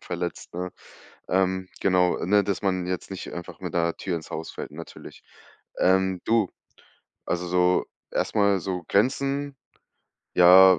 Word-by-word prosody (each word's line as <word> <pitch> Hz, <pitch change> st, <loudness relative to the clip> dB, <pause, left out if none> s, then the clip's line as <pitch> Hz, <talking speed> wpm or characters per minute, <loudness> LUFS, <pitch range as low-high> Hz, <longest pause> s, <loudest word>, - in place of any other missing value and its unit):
verletzt, 85 Hz, 0 st, -5 dB
ne? 90 Hz, +1 st, -3 dB, 0.6 s
Ähm, 95 Hz, 0 st, +1 dB
genau, 90 Hz, -2 st, +3 dB
ne, 100 Hz, +2 st, +4 dB
dass 100 Hz, +1 st, -2 dB
man 95 Hz, -2 st, 0 dB
jetzt 90 Hz, +1 st, -4 dB
nicht 95 Hz, -, -6 dB
einfach 85 Hz, 0 st, -8 dB
mit -, -, -5 dB
'ner 85 Hz, -1 st, +1 dB
Tür 90 Hz, -3 st, -2 dB
ins 80 Hz, -, -7 dB
Haus 80 Hz, +1 st, -4 dB
fällt -, -, -7 dB
natürlich. -, -, -10 dB, 0.6 s
Ähm, 95 Hz, 0 st, +3 dB
du 110 Hz, -5 st, +3 dB, 0.8 s
also, 90 Hz, 0 st, -2 dB
so 90 Hz, 0 st, +3 dB, 0.3 s
erst -, -, -1 dB
mal 100 Hz, -2 st, +4 dB
so, 90 Hz, -1 st, -3 dB
Grenzen, 135 Hz, +5 st, +1 dB, 0.8 s
ja, 90 Hz, 0 st, +8 dB
95 Hz, 145 wpm, -26 LUFS, 90-100 Hz, 0.8 s, ja